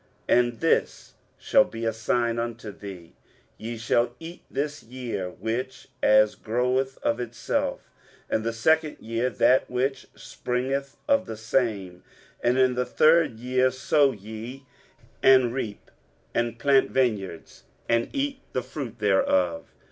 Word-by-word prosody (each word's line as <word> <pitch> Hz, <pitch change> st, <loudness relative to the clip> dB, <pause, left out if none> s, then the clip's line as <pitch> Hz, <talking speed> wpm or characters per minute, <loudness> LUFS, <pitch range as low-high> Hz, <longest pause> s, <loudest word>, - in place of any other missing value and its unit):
23:037:030 -, -, +5 dB
And 120 Hz, -1 st, -1 dB
this 165 Hz, -, 0 dB, 0.2 s
shall 275 Hz, -, +4 dB
be 115 Hz, -, -6 dB
a 115 Hz, -, +1 dB
sign 115 Hz, +1 st, 0 dB
unto 115 Hz, -2 st, -4 dB
thee, 95 Hz, -4 st, -10 dB, 0.5 s
Ye 115 Hz, +1 st, -5 dB
shall 120 Hz, +1 st, +1 dB
eat 165 Hz, +2 st, -9 dB
this 145 Hz, +1 st, -3 dB
year 115 Hz, -7 st, -5 dB
such 125 Hz, +4 st, -3 dB
as 105 Hz, 0 st, +5 dB
groweth 125 Hz, +4 st, -1 dB
of 115 Hz, -, +1 dB
itself; 120 Hz, -1 st, -3 dB, 0.4 s
and 110 Hz, -, -1 dB
the 115 Hz, -, -1 dB
second 155 Hz, +7 st, +1 dB
year 115 Hz, +3 st, -1 dB
that 130 Hz, +1 st, +3 dB
which 130 Hz, +2 st, -1 dB
springeth 135 Hz, +3 st, -3 dB
of 280 Hz, -1 st, +2 dB
the 110 Hz, -, -6 dB
same: 110 Hz, -6 st, -1 dB, 0.4 s
and 120 Hz, +1 st, +2 dB
in 130 Hz, -1 st, +4 dB
the 125 Hz, 0 st, 0 dB
third 155 Hz, 0 st, +3 dB
year 130 Hz, +2 st, +2 dB
sow 135 Hz, +2 st, +2 dB
ye, 110 Hz, +5 st, -9 dB, 0.6 s
and 130 Hz, -3 st, +5 dB
reap, 115 Hz, -6 st, -5 dB, 0.4 s
and 120 Hz, -1 st, -1 dB
plant 135 Hz, +3 st, +3 dB
vineyards, 105 Hz, -10 st, -2 dB, 0.2 s
and 115 Hz, 0 st, +1 dB
eat 275 Hz, -1 st, -2 dB
the 130 Hz, -, -1 dB
fruit 125 Hz, -5 st, -6 dB
thereof. 95 Hz, -5 st, +1 dB
120 Hz, 140 wpm, -26 LUFS, 110-130 Hz, 0.6 s, 23:037:030